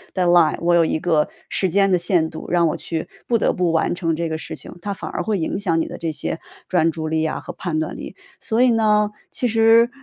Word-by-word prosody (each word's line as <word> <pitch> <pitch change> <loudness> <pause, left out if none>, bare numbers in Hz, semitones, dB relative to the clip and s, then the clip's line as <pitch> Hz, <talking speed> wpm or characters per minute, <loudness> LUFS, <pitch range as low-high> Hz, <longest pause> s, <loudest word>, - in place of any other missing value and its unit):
dead 185 -2 +1
line， 175 -3 +4
我 175 +1 +2
有 170 -1 +5
一 160 - 0
个 155 -3 +1 0.2
时 190 - +1
间 195 +2 +3
的 180 - +3
限 175 -2 +2
度， 160 - -8
让 170 -1 +3
我 - - -2
去 165 -2 -4 0.2
不 235 - +3
得 - - +1
不 180 -2 0
完 165 - +1
成 165 -3 -1
这 170 +1 -2
个 160 0 -3
事 - - -7
情。 - - -11
它 200 0 -3
反 - - -6
而 - - -3
会 215 -2 -1
影 165 +3 -2
响 170 -5 +1
你 160 - -1
的 - - -8
这 165 -1 -2
些 155 +2 -4 0.3
专 165 -3 +2
注 160 -1 -4
力 160 0 0
啊， 160 - -2
和 - - -8
判 165 -4 -3
断 155 - -3
力。 - - -8 0.2
所 225 +1 -1
以 255 - +5
呢， 210 -2 +3 0.2
其 245 - 0
实， 225 +1 +5
175 Hz, 310 characters per minute, -21 LUFS, 160-205 Hz, 0.3 s, 有